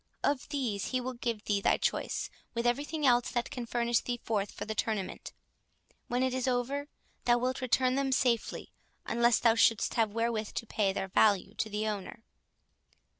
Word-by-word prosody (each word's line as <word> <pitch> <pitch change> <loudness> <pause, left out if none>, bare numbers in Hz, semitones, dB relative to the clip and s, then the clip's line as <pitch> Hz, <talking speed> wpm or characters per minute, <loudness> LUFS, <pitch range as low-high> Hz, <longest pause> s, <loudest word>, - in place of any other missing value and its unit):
Of 285 -1 0
these 250 -9 -1
he 255 - 0
will 255 +1 -4
give 235 -3 -3
thee 200 -1 +1
thy - - +3
choice, - - -1 0.2
with 235 +1 -1
every 245 +4 +1
thing 305 -1 -2
else 245 -2 +4
that 240 0 -2
can 250 -5 -5
furnish 235 -1 +1
thee 240 -1 -3
forth 205 -3 -1
for - - -6
the 220 - -3
tournament: 215 -3 -3 0.8
when 245 +1 0
it 260 -1 +1
is 260 0 -1
over, 260 +3 -1 0.4
thou 240 0 +5
wilt 255 +2 -1
return 255 0 +2
them 270 0 0
safely—unless 235 -1 0
thou 230 -2 +4
shouldst 225 -1 +3
have 225 -3 +2
wherewith 230 -1 -1
to - - -2
pay 210 -3 +1
their 190 0 -3
value 200 0 +3
to 220 0 -2
the 210 +1 -2
owner." 210 +1 -5
235 Hz, 180 wpm, -31 LUFS, 220-255 Hz, 0.8 s, thou